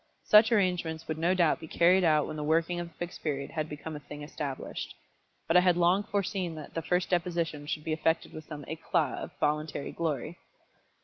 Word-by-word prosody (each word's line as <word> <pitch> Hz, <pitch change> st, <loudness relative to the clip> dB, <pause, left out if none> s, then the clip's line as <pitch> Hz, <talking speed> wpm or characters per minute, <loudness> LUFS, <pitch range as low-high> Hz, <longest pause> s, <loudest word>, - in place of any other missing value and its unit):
Such 215 Hz, +2 st, +6 dB
arrangements 180 Hz, -6 st, +1 dB
would 155 Hz, 0 st, -3 dB
no 175 Hz, +3 st, +2 dB
doubt 170 Hz, -3 st, +3 dB
be 160 Hz, -, -9 dB
carried 180 Hz, +4 st, +4 dB
out 155 Hz, -3 st, +4 dB
when 155 Hz, -, -5 dB
the 150 Hz, -, -4 dB
working 165 Hz, +3 st, +1 dB
of 175 Hz, -, -4 dB
the 165 Hz, -, -18 dB
Fixed 175 Hz, +1 st, -6 dB
Period 140 Hz, -3 st, -2 dB
had 155 Hz, -1 st, -3 dB
become 150 Hz, +1 st, -6 dB
a -, -, -5 dB
thing 145 Hz, 0 st, -9 dB
established. 145 Hz, -2 st, -5 dB, 0.5 s
But 165 Hz, -, +1 dB
I -, -, +10 dB
had 180 Hz, -1 st, +3 dB
long 175 Hz, +3 st, +4 dB
foreseen 195 Hz, -4 st, -2 dB
that 155 Hz, -2 st, -9 dB
the 165 Hz, -, -2 dB
first 180 Hz, +3 st, 0 dB
deposition 170 Hz, -4 st, -1 dB
should 150 Hz, -, -3 dB
be 160 Hz, -, -1 dB
effected 160 Hz, +1 st, 0 dB
with 155 Hz, -1 st, -8 dB
some 145 Hz, -3 st, -8 dB
éclat 160 Hz, -2 st, -1 dB
of -, -, -5 dB
voluntary 150 Hz, -1 st, -1 dB
glory. 160 Hz, 0 st, -3 dB
165 Hz, 205 wpm, -29 LUFS, 150-175 Hz, 0.5 s, I